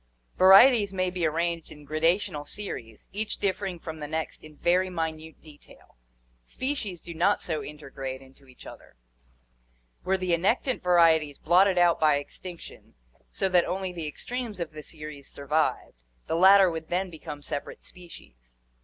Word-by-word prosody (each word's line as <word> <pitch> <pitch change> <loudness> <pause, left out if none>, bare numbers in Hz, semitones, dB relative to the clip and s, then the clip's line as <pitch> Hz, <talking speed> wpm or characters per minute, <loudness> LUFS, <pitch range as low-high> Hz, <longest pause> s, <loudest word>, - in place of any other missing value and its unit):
Vari 190 +5 +9
eties 215 -7 +1
may 185 -1 0
be 180 -3 0
arranged 165 +1 -2
in 150 -1 -13
gradational 155 0 0
series, 115 - -7
each 215 +2 -3
differing 195 -2 -2
from 160 -1 -8
the 150 - -5
next 160 +1 -4
in 155 -1 -14
very 180 +2 +2
minute 160 -2 -5
detail. 150 -2 -18 0.5
Species 215 - -4
do 170 - -8
not 180 +5 +2
so 160 -3 -3
intergrade 135 -3 -7
into 135 +1 -19
each 130 - -16
other. - - -13 1.1
Were 190 +1 +1
the 185 -2 -1
annectant 220 +9 +1
varieties 165 -5 +3
blotted 185 +3 +3
out 175 -1 +4
by 155 -2 +4
extinction 170 +4 -9 0.4
so 195 - -1
that 180 -2 +4
only 190 0 -3
the 165 -3 -4
extremes 235 +5 -5
of 170 -2 -4
the 155 0 -9
series 150 -2 -9
survived, 145 - -2 0.2
the - - -3
latter 190 +2 +6
would 160 -1 -6
then 180 +1 -1
become 150 -2 -9
separate 145 - -6
species. - - -15
170 Hz, 155 wpm, -27 LUFS, 150-185 Hz, 1.1 s, Vari